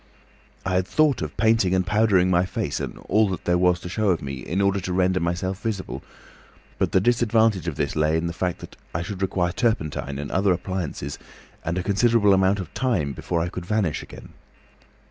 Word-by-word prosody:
"I 95 - -1
had 90 0 +1
thought 155 -7 +2
of 75 -1 -5
painting 110 -5 +3
and 95 -1 +1
powdering 100 -2 +3
my 90 0 +4
face 95 - -3
and - - -5
all 110 -1 +3
that 95 - -5
there 90 0 +2
was 90 -1 +3
to - - -7
show 105 +3 0
of 90 - +2
me, 70 -1 -5
in 85 +7 -3
order 100 0 +2
to 90 -1 -4
render 95 0 +2
myself 90 +3 -2
visible, 105 -5 -4 0.8
but - - +1
the - - +4
disadvantage 110 -4 +2
of 80 - -2
this 75 -1 -2
lay 80 +1 +2
in 80 - -1
the 85 - -2
fact 90 0 -2
that - - -10 0.2
I 85 - -1
should 95 +1 -6
require 90 -2 0
turpentine 80 - -1
and 70 0 -5
other 95 0 +3
appliances 90 -6 -4 0.4
and 85 - -2
a 90 - -1
considerable 105 +1 +3
amount 95 +1 +3
of 90 - -7
time 95 - 0
before 85 +6 -2
I 85 - -1
could 90 -1 -7
vanish 105 -7 0
again. - - -12
95 Hz, 205 wpm, -24 LUFS, 85-105 Hz, 0.8 s, my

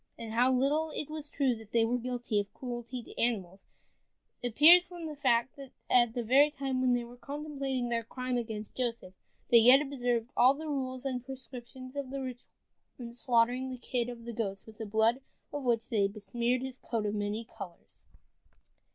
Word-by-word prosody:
And 225 -1 -6
how 245 +3 +4
little 285 +5 +2
it 305 0 -4
was 305 -1 -3
true 270 -5 +1
that 220 -1 -14
they 230 -1 +4
were 245 +2 0
guilty 245 -3 -1
of 200 0 -4
cruelty 245 -1 -5
to - - -7
animals, 195 -5 -1 0.8
appears 310 +9 +7
from 350 -2 -8
the 305 -1 -5
fact 240 -1 +2
that 275 -2 -10 0.2
at 240 -2 +4
the 240 - -1
very 270 +6 +5
time 275 -3 -2
when 250 -1 +3
they 240 - -1
were 240 +1 -12
contemplating 275 -3 -3
their 230 -1 0
crime 255 +2 -3
against 220 -3 -4
Joseph, 230 -7 -3 0.4
they 235 - +9
yet 250 +4 +8
observed 245 -5 -1
all 255 +3 +6
the 315 +2 -7
rules 260 -2 -3
and 255 -3 -2
prescriptions 255 0 -9
of 280 -2 -4
the 275 +1 -4
ritual 255 -2 -7 0.5
in 235 -2 -8
slaughtering 245 +1 +2
the 255 - -5
kid 245 -1 -2
of 235 -1 -9
the 235 - -5
goats 195 -3 -3
with 220 0 -14
the 220 - -4
blood 220 +5 +2 0.3
of 290 - -3
which 235 -3 0
they 205 -3 +2
besmeared 235 +5 -1
his 265 -1 -5
coat 225 -3 -2
of 205 - -1
many 210 +2 -2
colors. 175 -5 -11
245 Hz, 195 wpm, -31 LUFS, 230-265 Hz, 0.8 s, they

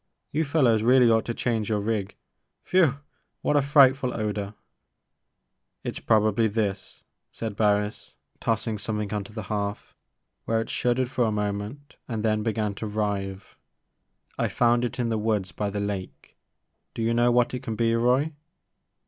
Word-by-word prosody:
You 155 +2 0
fellows 130 -7 +3
really 125 +1 +5
ought 110 -1 +3
to 120 - -2
change 115 -3 -1
your 105 -1 +1
rig 105 -1 -2 0.3
— - - -52
whew! 165 -8 +4 0.5
what 150 - +2
a 145 - +5
frightful 135 -2 +4
odor! 105 -1 -3 0.6
" - - -53
It - - -4
's - - -5
probably 110 0 +3
this," 100 -2 -3 0.3
said 110 -3 -5
Barris 105 0 0 0.2
tossing 110 -1 -1
something 105 -1 -3
onto 105 -1 -4
the 110 -1 -6
hearth 100 0 -4 0.5
where 115 0 +1
it 115 - -4
shuddered 125 +1 0
for 120 - +1
a 110 - +1
moment 105 +7 -4
and 115 -3 -3
then 110 -1 +2
began 110 -2 -1
to 110 - -4
writhe; 100 -2 -3 0.8
I - - +2
found 120 0 +2
it 120 0 -3
in 120 -2 0
the 110 -1 0
woods 105 -4 0
by 105 -1 -2
the 100 +1 -3
lake. 100 -2 -5 0.6
Do 115 - -2
you 115 +1 +1
know 120 +1 +3
what 120 0 +2
it 125 - -3
can 115 -5 -4
be, 115 +1 +2
Roy 125 +7 +2
110 Hz, 170 wpm, -26 LUFS, 105-120 Hz, 0.8 s, really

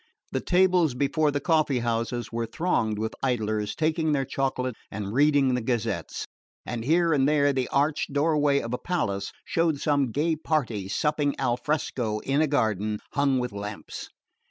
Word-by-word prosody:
The - - -1
tables 180 -6 +3
before 145 +3 +1
the 145 0 0
coffee 155 -3 +2
houses 120 0 -2
were 115 0 -2
thronged 115 -6 0
with 110 +1 -2
idlers 110 -5 -1
taking 160 -1 +1
their 135 -2 +1
chocolate 130 -1 -1 0.2
and 100 0 -5
reading 140 -1 +4
the 125 - 0
gazettes; 110 -7 -2 0.4
and 115 -1 -4
here 165 +4 +3
and 140 -1 +3
there 145 -2 +3
the 130 -2 0
arched 145 +2 0
doorway 145 -1 +2
of 115 +1 -5
a 125 - -2
palace 100 - -2
showed 165 -3 +1
some 140 -5 +1
gay 160 +6 +1
party 125 -11 -1
supping 150 +5 0
al 125 -2 +1
fresco 125 -6 -1
in 140 +2 +1
a 155 - +3
garden 110 -6 0
hung 140 -2 +2
with 125 -2 -2
lamps. 100 +1 -7
135 Hz, 165 wpm, -26 LUFS, 115-150 Hz, 0.4 s, reading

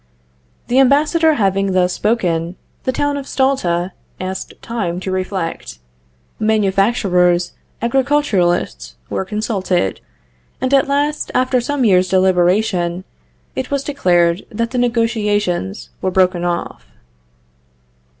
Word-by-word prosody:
The 250 +2 +2
ambassador 305 +4 +4
having 195 -3 +1
thus 180 -1 +2
spoken, 175 -6 0 0.3
the 260 - +1
town 290 +2 -1
of 280 -1 -6
Stulta 190 -10 0 0.3
asked 185 0 -5
time 195 -7 -3
to 190 - -3
reflect; 185 - -3 0.6
manufacturers, 195 -4 +2 0.3
agriculturists 210 - 0 0.2
were - - -1
consulted; 190 - -1 0.6
and 260 +1 -1
at 275 0 +4
last, 290 +2 0
after 255 0 +2
some 275 +1 -1
years' 185 -3 +4
deliberation, 185 -1 +2 0.5
it 260 - -3
was 280 -1 -1
declared 175 -11 +2
that 230 0 -3
the 250 - -1
negotiations 210 - 0
were 185 - 0
broken 185 -1 +2
off. 170 - -3
195 Hz, 110 wpm, -18 LUFS, 180-250 Hz, 0.6 s, ambassador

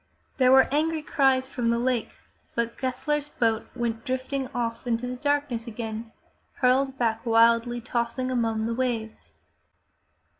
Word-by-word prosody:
There 255 -2 +5
were 265 0 +7
angry 315 +1 +1
cries 265 -3 +2
from 245 -3 -2
the 235 - +2
lake, 245 -1 -1 0.4
but 235 0 -1
Gessler's 295 +3 -2
boat 225 -4 0
went 230 -2 -2
drifting 260 +1 -2
off 240 -2 -4
into 235 +1 0
the 250 0 -4
darkness 285 -4 -1
again, 225 0 -5 0.4
hurled 265 +1 +2
back 230 -2 0
wildly 230 +1 +3
tossing 245 +2 -2
among 225 -3 0
the 230 - -1
waves. 230 -3 -3
245 Hz, 140 wpm, -26 LUFS, 230-260 Hz, 0.4 s, were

